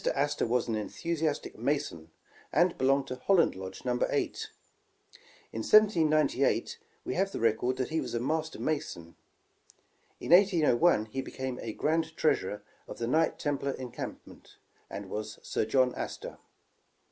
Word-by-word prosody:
Astor 145 -2 0
was 125 +1 +1
an 115 - -1
enthusiastic 155 +8 -3
Mason, 140 - -2 0.4
and 175 +3 +3
belonged 135 +1 +2
to 130 - -4
Holland 180 +6 +3
Lodge 95 +4 -8
No. 125 -1 0
8. - - -2 1.0
In 110 - -3
1798, 155 - +3 0.3
we - - -2
have 195 +2 0
the - - -4
record 115 +3 +1
that 130 - -2
he 160 0 0
was - - -4
a - - +1
Master 160 +5 -2
Mason. 85 - -3 1.1
In - - -5
1801, 175 - +5
he 120 +5 -4
became 130 -1 -5 0.2
grand 160 +1 0
treasurer 105 -9 0 0.2
of - - -8
the 115 - -2
Knight 155 +7 +2
Templar 140 -2 -1
Encampment, 125 -2 -8 0.3
and 100 0 -6
was 105 +2 -5
Sir - - -1
John 125 +2 +3
Astor. - - -6
135 Hz, 140 wpm, -30 LUFS, 115-160 Hz, 1.1 s, 1801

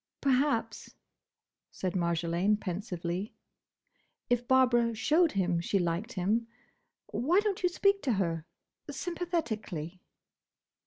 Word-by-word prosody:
"Perhaps," 275 -2 0 0.7
said 185 -2 -3
Marjolaine, 170 +3 +1
pensively, 180 0 -4 1.0
"if 245 0 +1
Barbara 240 -3 +4
showed 310 +9 +3
him 180 -3 +1
she 195 - 0
liked 180 +7 -1
him—Why 230 - -2
don't 415 -2 -1
you 360 - +3
speak 395 +2 +2
to 255 - +1
her? 165 -4 -1 0.4
Sympathetically." 220 - -3
220 Hz, 95 wpm, -30 LUFS, 180-275 Hz, 1.0 s, Barbara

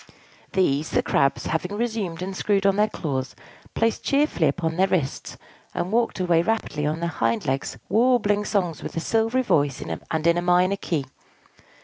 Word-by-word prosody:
These 155 -6 +1
the - - +1
Crabs, 140 0 +1
having 180 +6 -2
resumed 210 -7 -2
and 190 +1 -5
screwed 200 0 +1
on 195 -1 +4
their 210 +1 +2
claws, 135 -5 -3 0.4
placed 230 0 0
cheerfully 280 - +2
upon 160 +3 -1
their 190 +2 +3
wrists, 160 -8 -2 0.4
and 180 - -2
walked 230 -3 +1
away 175 -2 +3
rapidly 170 -7 -1
on 155 +2 -2
their 170 - 0
hind 115 -7 -1
legs, 135 +1 -2
warbling 220 -2 +3
songs 180 -8 -1
with - - -6
a - - +2
silvery 225 +7 +1
voice 145 - +1
and 155 - -4
in 170 0 +4
a - - -2
minor 180 +2 +3
key. 155 -7 -2
180 Hz, 170 wpm, -24 LUFS, 155-210 Hz, 0.4 s, on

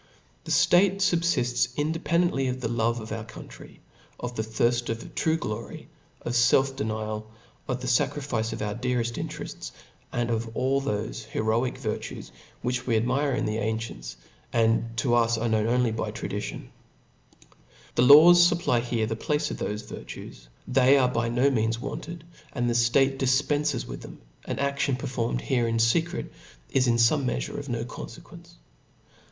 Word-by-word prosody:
The - - -5
iftate 190 +2 +4
fubfifts 165 -10 +1
independently 160 -1 +1
of 130 0 -2
the 125 - -2
love 115 0 0
of 110 -1 -8
OHr 110 0 -5
ciountry, - - -12 0.4
of 125 0 -4
thethirft 120 +2 0
of 115 0 -5
true 160 0 +1
glory, 115 -6 -6 0.3
of - - -3
fel^ 120 +2 +5
df 135 - -3
nial, 110 0 -3 0.4
of 125 -1 -2
the 125 - -4
fecrifice 120 -2 0
of - - -4
our 105 -1 -2
dcareft 120 -1 -1
interefts, - - -7 0.4
and 120 0 -1
^ 115 0 -2
all 135 +2 +1
thofe 110 -3 -3
heroic 110 +3 -1
virtues - - -5 0.3
which 125 +1 -2
we 115 -3 +3
admire 130 +5 +1
in - - -1
the 110 0 -1
gncients, 110 - -4 0.4
and 115 0 +1
to 125 - 0
gs 115 -1 +3
are 115 +2 -1
known 110 -1 +1
only 125 0 +2
by 110 - -3
ftory. - - -5 1.3
The - - +2
lawsfupply 170 -1 +7
here 120 -2 -1
the 110 +1 -2
place 150 +6 -1
of - - -4
thofe 105 +1 -4
virtues - - -9
t - - -21 0.2
they 130 +2 +5
arc 125 -2 +2
by 115 0 0
|io 125 +4 +3
means 115 -2 0
wanted, 155 +5 -6 0.3
and 120 -3 -1
the 120 - +1
ftate 135 +3 +3
dii 130 +1 +3
peafcs 145 -3 0
wi;h - - -7
them: - - -11 0.3
an - - -3
adtion 140 -1 0
performed 115 - -2
here 115 - +1
in 115 0 0
fe 115 +8 +4
ast 175 - -7 0.6
is 130 -2 +2
in 120 - +3
foooe 120 +5 +3
meafure 125 +2 -2
of 140 -1 -8
no 115 -1 -2
confequence. 125 - -11
120 Hz, 170 wpm, -26 LUFS, 115-135 Hz, 1.3 s, lawsfupply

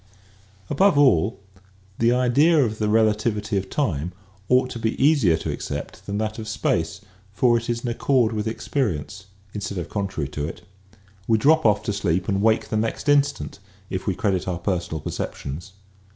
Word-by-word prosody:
After 190 - +3
all, 110 - +3 0.6
the 115 +1 +4
idea 130 +7 +4
of 110 -1 -4
the 105 -1 +1
relativity 110 0 +1
of 95 -1 -1
time 90 - -1 0.4
ought 125 0 +3
to 120 - -5
be 110 0 -2
easier 135 - +4
to - - -3
accept - - -6
than 100 0 -2
that 110 +1 -2
of 110 - -6
space 100 -3 -1 0.3
for 120 +4 +3
it 115 0 -2
is 115 0 -1
in 125 - -4
accord 120 0 +2
with 105 0 -2
experience 105 - -3 0.3
instead 100 -1 -4
of 85 - -4
contrary 95 -8 -3
to 75 +1 -3
it. 90 - -9 0.6
We 115 - +4
drop 155 +6 +4
off 105 -1 +2
to 105 - -2
sleep 90 -3 0
and 100 -2 0
wake 110 0 +2
the 110 - 0
next 115 +6 -2
instant 145 -7 +1 0.3
if 95 +1 -4
we 95 - +1
credit 95 -2 0
our 90 -2 -1
personal 85 -3 -2
perceptions. 75 +8 -5
110 Hz, 175 wpm, -23 LUFS, 95-120 Hz, 0.6 s, the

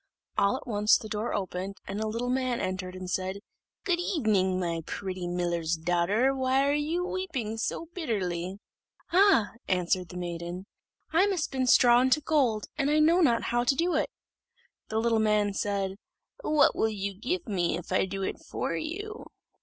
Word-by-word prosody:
All 200 +6 +2
at - - -11
once 210 -3 +4
the 220 - -8
door 215 +2 -2
opened, 190 0 -3
and 200 +2 -3
a 220 - -1
little 235 +3 -2
man 255 -2 0
entered, 185 0 -3
and 185 0 -6
said, 185 +1 -2 0.5
"Good 355 -3 +1
evening, 215 - +1
my 170 -2 -1
pretty 185 -2 -4
miller's 175 -2 -1
daughter 175 +10 +2
why 265 +1 +2
are 285 - +2
you 315 +5 0
weeping 275 - -3
so 280 +8 -2
bitterly?" 190 - -2 0.6
"Ah!" 380 - +5 0.2
answered 180 -1 0
the 180 - -8
maiden, 175 +1 -5 0.5
"I 370 +5 +5
must 375 -6 0
spin 260 -3 -1
straw 245 -1 +6
into 260 +3 +3
gold, 270 -8 +1
and 275 - +2 0.2
know 340 +3 +4
not 240 -8 +3
how 240 0 +3
to 260 +3 +2
do 340 +4 +1
it." 310 - +1 0.8
The 220 - -2
little 225 0 +2
man 210 -2 +2
said, 195 -1 -2 0.4
"What 300 -1 +3
will 220 - +2
you 200 -2 -3
give 300 - -3
me 175 -5 0
if 175 - -9
I 185 - +3
do 195 +1 -4
it - - -3
for - - -3
you?" 405 - -5
215 Hz, 175 wpm, -28 LUFS, 185-270 Hz, 0.8 s, straw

